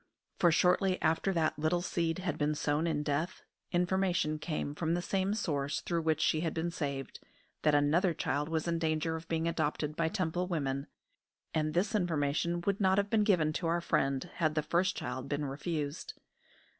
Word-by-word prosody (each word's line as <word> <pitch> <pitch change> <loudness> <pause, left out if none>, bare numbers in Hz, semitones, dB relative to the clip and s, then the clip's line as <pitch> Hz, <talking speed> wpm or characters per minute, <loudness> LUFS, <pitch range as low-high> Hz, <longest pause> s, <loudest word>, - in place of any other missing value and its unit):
For 175 - +5
shortly 185 +3 +3
after 165 +5 +1
that 160 -4 0
little 160 +3 +1
seed 165 -1 -1
had 185 -4 -2
been 150 0 +1
sown 150 +3 0
in 150 -3 0
death, 150 +4 -2 0.3
information 175 -3 +1
came 150 -2 -3
from 165 +2 0
the 175 - -1
same 195 +2 0
source 145 -8 -1
through 170 -1 -1
which 160 -1 +1
she 155 - +2
had 165 -2 -2
been 170 +1 -1
saved, 140 -5 -4 0.4
that 150 -1 +4
another 160 +5 +3
child 145 +3 -1
was 160 0 -1
in 170 -1 0
danger 160 0 0
of 160 +1 -7
being 165 0 0
adopted 150 -2 -1
by 165 0 +1
Temple 180 -1 -1
women; 140 -5 -2 0.7
and 155 0 0
this 190 +6 +1
information 170 -2 0
would 200 +3 -1
not 190 0 +4
have 200 0 +1
been 220 -2 +4
given 165 -7 +3
to 165 - -2
our 170 +1 +2
friend 135 -3 0
had 155 -2 +1
the 155 - +1
first 185 +5 +1
child 130 +2 -4
been 145 0 -1
refused. 150 - -4
160 Hz, 185 wpm, -32 LUFS, 150-175 Hz, 0.7 s, For